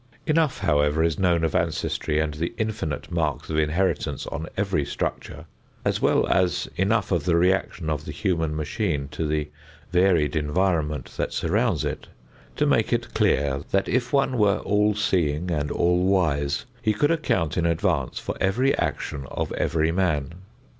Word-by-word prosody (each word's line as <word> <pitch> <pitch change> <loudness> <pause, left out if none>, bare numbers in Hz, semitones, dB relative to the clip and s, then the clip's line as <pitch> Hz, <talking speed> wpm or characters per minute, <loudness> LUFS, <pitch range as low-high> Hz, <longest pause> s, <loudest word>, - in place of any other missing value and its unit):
Enough, 155 -2 +2
however, 75 +2 +2
is 80 -2 0
known 85 -3 +2
of 80 - 0
ancestry 80 -3 -1
and 80 -1 0
the 85 +8 -4
infinite 90 - -3
marks 80 -3 -1
of 80 - -1
inheritance 80 +5 0
on 80 0 -5
every 95 -7 +1
structure - - -4 0.4
as - - 0
well - - +3
as 90 -2 +1
enough 100 +2 +1
of 85 -4 +1
the 90 -2 +3
reaction 90 -1 +1
of 75 -1 -2
the - - -5
human 80 -6 -1
machine 75 -2 -2
to 75 +2 -3
the 75 0 -2 0.4
varied 90 -5 +3
environment 75 0 0
that - - -2
surrounds 100 - +1
it, - - -4 0.5
to - - +1
make - - +2
it - - -1
clear 70 0 +1
that 95 0 +1
if 125 0 0
one 135 -3 +2
were 105 -1 +4
all 105 0 +2
seeing 90 -5 0
and 75 -2 -1
all 90 +1 +2
wise 80 -7 +1 0.2
he 110 -3 +1
could 145 +9 +2
account 95 - 0
in 85 -1 +1
advance 80 -4 0
for - - -4
every 125 +8 +2
action 70 -3 -3
of - - -3
every 80 0 +1
man. 85 -5 0
85 Hz, 165 wpm, -24 LUFS, 75-95 Hz, 0.5 s, were